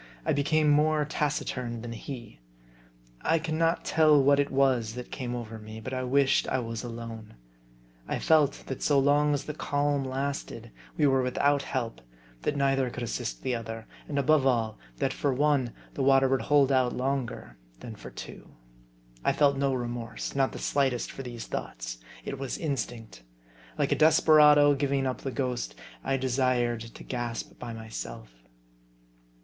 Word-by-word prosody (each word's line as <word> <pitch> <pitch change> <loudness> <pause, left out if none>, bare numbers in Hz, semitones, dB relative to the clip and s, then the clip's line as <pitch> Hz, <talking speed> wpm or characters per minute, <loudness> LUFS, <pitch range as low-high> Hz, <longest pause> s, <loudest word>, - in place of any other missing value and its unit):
I - - +2
became 150 +2 +2
more 150 0 +3
taciturn 125 -6 -2
than 120 - -6
he. 115 - -8 0.8
I 165 - +2
can 160 0 -2
not 165 +1 +1
tell 155 -2 +5
what 140 +1 +4
it 145 - +2
was 130 -5 +2
that 125 0 -7
came 125 -2 -4
over 115 -2 -6
me, 110 +1 -9
but 130 +4 -6
I 130 - -1
wished 135 +2 +2
I - - 0
was 115 -2 -4
alone. 115 - -7 0.7
I - - -1
felt 150 -3 +3
that 135 - -5
so 145 - +3
long 145 +2 +4
as 145 - -3
the 150 - -4
calm 145 -1 0
lasted, 135 +2 -4 0.3
we - - +3
were 135 -2 +4
without 140 +3 +2
help; 125 -4 -3 0.4
that 145 - -1
neither 135 -2 +2
could 120 0 -6
assist - - -4
the 130 - 0
other; 115 -1 -5 0.2
and 145 - -3
above 140 -1 +4
all, 115 -4 0 0.2
that - - 0
for 140 - 0
one, 140 -2 +2 0.2
the - - -3
water 135 0 +5
would 135 0 +1
hold 140 -2 +4
out 130 -2 +3
longer 130 - -3 0.3
than - - -8
for - - -10
two. - - -10 0.7
I - - +3
felt 140 -1 +3
no 140 0 +1
remorse, 120 -2 -4
not 135 -1 +2
the - - -7
slightest, 135 -4 0
for - - -7
these 120 -3 -7
thoughts. - - -5 0.3
It 135 - -5
was 135 -2 -3
instinct. 120 - -4 0.6
Like - - +1
a - - +4
desperado 150 -2 +6
giving 140 -1 0
up 130 -1 -2
the 135 - -3
ghost, 125 - -3 0.3
I 135 - 0
desired 125 -2 +1
to 115 0 -10
gasp 120 -2 -5
by 120 - -6
myself. 110 - -7
135 Hz, 170 wpm, -28 LUFS, 120-145 Hz, 0.8 s, desperado